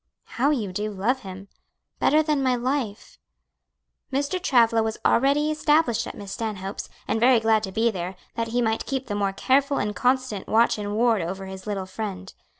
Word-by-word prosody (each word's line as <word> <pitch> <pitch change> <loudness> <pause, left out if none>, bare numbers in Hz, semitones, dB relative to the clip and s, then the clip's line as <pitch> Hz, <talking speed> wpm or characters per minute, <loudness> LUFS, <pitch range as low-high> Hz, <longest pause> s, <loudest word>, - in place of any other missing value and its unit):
'" - - -52 0.2
"How 275 +4 +4
you 230 -10 -1
do 210 +3 -2
love 210 +6 0
him!" 195 -3 -9 0.5
"Better 310 +1 +4
than 300 -2 0
my 255 -2 +2
life!" 245 -4 -3 0.9
Mr. 285 +7 -1
Travilla 230 -8 +4
was 220 0 -2
already 285 +4 +3
established 300 -6 +2
at - - -7
Miss 200 -1 -8
Stanhope's, 200 -3 -5 0.2
and 225 - 0
very 245 +1 +5
glad 220 -1 +3
to 195 -3 -5
be 225 +3 +2
there, 185 -1 -5 0.2
that 230 0 -2
he 240 +2 0
might 220 0 -1
keep 265 -1 -2
the 210 - -4
more 200 -1 0
careful 275 +7 +2
and 210 0 -2
constant 255 -5 0
watch 225 0 +3
and 205 0 -3
ward 230 -2 +3
over 190 +3 -4
his 190 0 -9
"little 200 -2 -2
friend." 190 -1 -6
225 Hz, 190 wpm, -24 LUFS, 200-260 Hz, 0.9 s, very